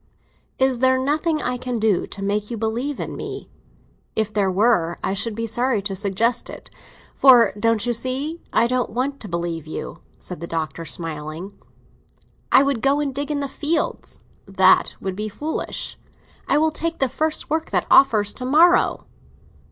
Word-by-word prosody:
"Is 260 -2 +1
there 260 0 +4
nothing 305 +4 0
I 250 0 -1
can 245 -1 -3
do 215 -4 +1
to 195 - -7
make 205 +1 -1
you 235 - -4
believe 235 +6 -2
in - - -5
me?" - - -7 0.6
"If 215 -1 -1
there 200 -2 +1
were 185 -4 +2
I - - 0
should 210 +2 -1
be 230 +1 -3
sorry 240 +1 0
to 195 -1 -3
suggest 205 +4 0
it, - - -9 0.4
for—don't 230 -3 +4
you 240 - +1
see?—I 260 +4 -1
don't 250 +1 0
want 270 +4 -2
to 215 - -5
believe 170 -3 -4
in 155 - -7
you!" - - -6 0.2
said 180 - -7
the 170 - -6
Doctor, 165 0 -4
smiling. 160 +3 -5 1.0
"I 265 - +7
would 275 -5 -1
go 275 +1 +2
and 285 -2 -2
dig 285 +2 -3
in 290 -1 -1
the 280 - -2
fields." 310 +4 -2 0.3
"That 190 -1 +4
would 190 -1 -4
be 210 +2 -3
foolish." 300 +9 -4 0.5
"I - - +3
will 315 +1 +2
take 330 +2 -3
the 270 - +2
first 310 +4 -1
work 320 +1 -1
that - - 0
offers, 215 -7 +5
to 250 - -5
morrow." 325 +7 +4
235 Hz, 175 wpm, -22 LUFS, 200-275 Hz, 1.0 s, I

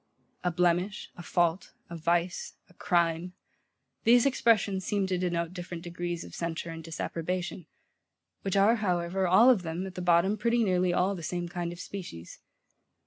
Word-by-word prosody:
A 180 - +2
blemish, 180 +3 0
a - - -9
fault, 175 +1 0
a 170 - -8
vice, 170 +2 -1
a 180 - -22
crime; 170 0 0 0.7
these 240 +2 +6
expressions 215 -7 +2
seem 200 +1 0
to 185 -1 -1
denote 170 -1 -1
different 175 -2 -7
degrees 175 -1 -4
of - - -12
censure 170 0 -4
and 165 0 -8
disapprobation; 170 +2 -4 0.7
which 195 0 -1
are, 210 +4 +5
however, 185 -2 0
all 220 +8 +7
of 225 -7 +2
them, 170 +2 -4
at 190 - -7
the 180 - -5
bottom, 175 +4 +3
pretty 235 +1 +2
nearly 180 -3 +2
all 180 +3 +2
the 180 - -6
same 175 +2 -3
kind 175 -1 -4
of 175 - -9
species. 175 - -8
180 Hz, 165 wpm, -29 LUFS, 170-190 Hz, 0.7 s, all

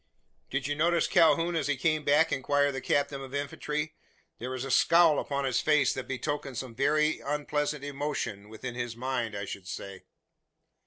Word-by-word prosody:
"Did - - -2
you 145 - 0
notice 170 +2 +2
Calhoun 165 +1 +4
as 155 -4 0
he 145 -2 0
came 155 +2 +1
back?" 145 +3 +4
inquired 145 +1 +2
the 135 -1 -5
captain 140 0 0
of 135 0 -7
infantry. 150 +2 -3 0.5
"There 125 - -5
was 130 0 -4
a 135 - -4
scowl 165 +3 +5
upon 140 -1 -2
his 130 -2 +1
face 150 -3 +3
that 130 - -5
betokened 135 -1 -3
some 125 -2 -5
very 150 +5 +2
unpleasant 150 0 -2
emotion 135 -8 -4
within 115 +3 -6
his 120 -1 -4
mind, 120 -3 -2
I 100 - -4
should 95 -1 -7
say." 95 0 -7
140 Hz, 175 wpm, -29 LUFS, 130-150 Hz, 0.5 s, scowl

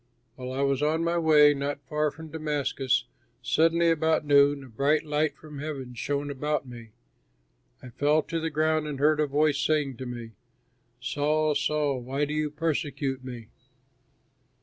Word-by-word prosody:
While 130 0 -6
I 135 +2 -1
was 140 0 +1
on 155 +2 +1
my 170 +1 +1
way 150 -2 +6
not 140 0 -3
far 150 0 0
from 160 +2 -11
Damascus, 140 -5 -1 0.4
suddenly, 165 +6 +3
about 160 -1 +1
noon, 140 -1 +4
a - - -11
bright 140 +6 +1
light 150 0 0
from 150 -2 -10
heaven 140 -4 -5
shone 145 +3 -2
around 150 +2 -2
me. 120 -2 -10 0.9
I 125 - -9
fell 145 +5 +2
to 165 0 -3
the 165 0 -2
ground 155 0 +1
and 145 -2 -4
heard 150 +1 +3
a 150 - +2
voice 145 0 +2
saying 145 -4 0
to 130 - -6
me, 120 -2 -7 0.7
'Saul, 150 +4 0
Saul, 145 -1 0
why 135 +4 -2
do 150 - -4
you 155 0 0
persecute 145 -3 -2
me?' 120 -3 -8
145 Hz, 165 wpm, -27 LUFS, 135-155 Hz, 0.9 s, way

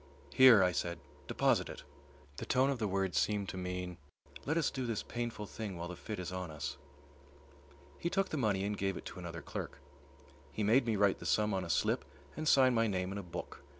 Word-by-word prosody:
"Here," 125 -4 +8
I 90 - +3
said, 85 +1 -2 0.3
"deposit - - +2
it." - - -8 0.5
The - - -5
tone 130 +2 +3
of 135 - -3
the 110 - 0
words 95 -3 0
seemed 105 -2 0
to - - -5
mean, 90 -1 -4 0.5
"Let 155 +3 +1
us 165 - +2
do 130 -2 -3
this 115 -3 -2
painful 120 -3 -4
thing 100 -3 -6
while 85 +1 -5
the 90 - -6
fit 105 +4 -6
is 90 0 -5
on 95 -2 -4
us." 75 -2 -5 1.2
He 170 - -1
took 195 +1 0
the - - -3
money 105 -8 +1
and 105 +1 -1
gave 95 -2 -1
it - - -9
to - - -7
another 85 -1 -7
clerk. - - -6 0.7
He 110 - -2
made 120 +4 +4
me 110 - +2
write 100 -1 +3
the - - -5
sum 105 -1 +2
on 95 -1 0
a 85 - -7
slip - - +1 0.3
and 155 - -3
sign 130 -3 +6
my 115 -1 +3
name 95 -2 -1
in 100 - -4
a - - -3
book. 85 -1 -7
100 Hz, 220 wpm, -34 LUFS, 90-115 Hz, 1.2 s, Here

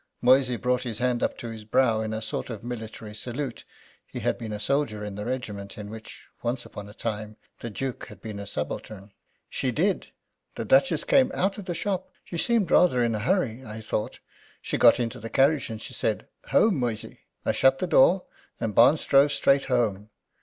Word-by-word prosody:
Moysey 125 0 +4
brought 125 +2 +1
his 115 -4 -4
hand 125 0 0
up - - 0
to 120 - -6
his 110 -1 -8
brow 110 0 +2
in 110 0 -3
a 110 0 -3
sort - - -4
of 115 -1 -6
military 110 -3 -7
salute 120 +3 -5 0.4
he - - -7
had - - +1
been 115 -2 -7
a 105 - -4
soldier 110 -3 0
in 105 - -5
the 105 +1 -5
regiment 110 -6 -5
in 105 -1 -7
which, 110 0 -11
once 120 +1 -2
upon 100 0 -9
a - - -12
time, 110 -2 -4 0.2
the 120 - -5
Duke 130 +4 -4
had - - -12
been 105 -3 -7
a 100 - -7
subaltern: 100 0 -5 0.4
"She 130 - -2
did. 180 - 0 0.5
The - - -4
Duchess - - +4
came 270 -2 +4
out 195 +3 0
of 200 - -8
the 175 -2 -3
shop. 190 0 -2 0.2
She 170 - -5
seemed 230 -5 +1
rather 130 -9 +5
in 115 -1 +1
a 105 - -1
hurry, 130 - 0
I 110 -2 -7
thought. 105 0 -3 0.4
She - - -3
got - - +6
into 120 +1 -2
the 115 0 -7
carriage, 140 +2 +3
and 110 -1 -5
she - - -9
said, - - -1 0.2
'Home, 205 -9 +4
Moysey!' 115 -4 -3 0.3
I - - +3
shut 135 0 +4
the 185 - -1
door, 180 +2 +5 0.4
and 110 -2 -2
Barnes 125 +9 +5
drove 140 +1 +5
straight 140 -1 +3
home. 110 -5 0
120 Hz, 205 wpm, -26 LUFS, 110-140 Hz, 0.5 s, got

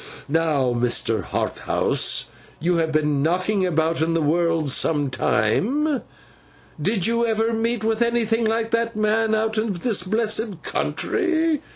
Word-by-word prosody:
Now, 145 -5 +1
Mr. 120 -2 0
Harthouse, - - -1 0.3
you 175 +2 +1
have 160 -1 0
been 150 -2 +1
knocking 185 +5 +1
about 160 -1 0
in 165 +1 +1
the 165 - +1
world 165 -1 +1
some 145 -1 0
time. 255 - +1 0.8
Did 195 +2 +1
you 235 +1 +1
ever 225 0 +1
meet 225 0 -1
with 225 +1 0
anything 235 -1 +1
like 225 +1 0
that 230 0 0
man 215 +1 +1
out 220 0 0
of 205 -6 -2
this 230 -7 +2
blessed 215 0 -1
country? 330 -6 0
210 Hz, 140 wpm, -22 LUFS, 160-230 Hz, 0.8 s, this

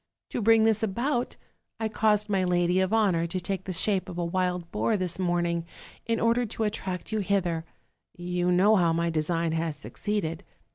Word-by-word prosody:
To - - -2
bring 225 +1 +5
this 220 -1 +3
about, 240 +5 -1 0.4
I 220 - 0
caused 210 -1 +2
my 195 -3 +1
lady 180 0 +2
of 190 +1 +1
honor 195 -7 +2
to 185 +2 -2
take 190 +1 -4
the 190 - -3
shape 190 +2 0
of 175 - -7
a 175 - -1
wild 180 -1 -1
boar 210 +1 +1
this 180 -2 -2
morning, 175 -2 0 0.4
in 230 -1 +1
order 230 +2 +2
to 225 0 -3
attract 195 -3 -3
you 220 - 0
hither; 180 -5 0 0.5
you 180 0 -1
know 200 +4 +5
how 170 -3 +3
my 170 0 0
design 165 +1 0
has 160 -2 -2
succeeded. 175 +1 -3
185 Hz, 185 wpm, -27 LUFS, 170-215 Hz, 0.5 s, bring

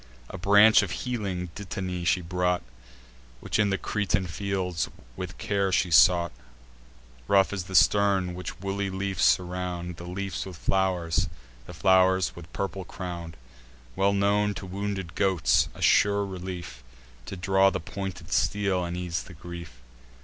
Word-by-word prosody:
A - - -7
branch 105 +3 +6
of 100 - -3
healing 95 -5 -3
dittany 90 -2 -5
she 90 +2 +2
brought, 90 +1 -1 0.8
Which - - -2
in 105 -1 +3
the 100 - +1
Cretan 95 -3 -1
fields 90 -1 -2 0.3
with - - -6
care 100 -2 0
she 90 -1 +1
sought: 85 0 +6 1.0
Rough 100 0 +4
is 95 -3 -3
the 95 - -7
stem, 95 +4 +4
which 90 -1 -7
woolly 100 +1 -2
leafs 95 -1 -2
surround; 90 -1 0
The 85 - -9
leafs 95 +1 -4
with 90 -3 -9
flow'rs, 90 -5 0 0.4
the 90 - -9
flow'rs 95 0 +3
with 85 -1 -11
purple 100 -1 -4
crown'd, 85 -2 -7 0.6
Well 100 +1 +2
known 100 +1 +2
to - - -6
wounded 95 -2 -4
goats; 95 -3 +2
a - - -6
sure 100 0 +4
relief 90 -9 -7 0.4
To 95 - -6
draw 95 +1 +3
the - - -3
pointed 95 +2 -7
steel, 100 -3 +1
and 85 0 -4
ease 90 -2 -2
the 90 - -12
grief. 85 -7 -10
95 Hz, 150 wpm, -27 LUFS, 90-100 Hz, 1.0 s, branch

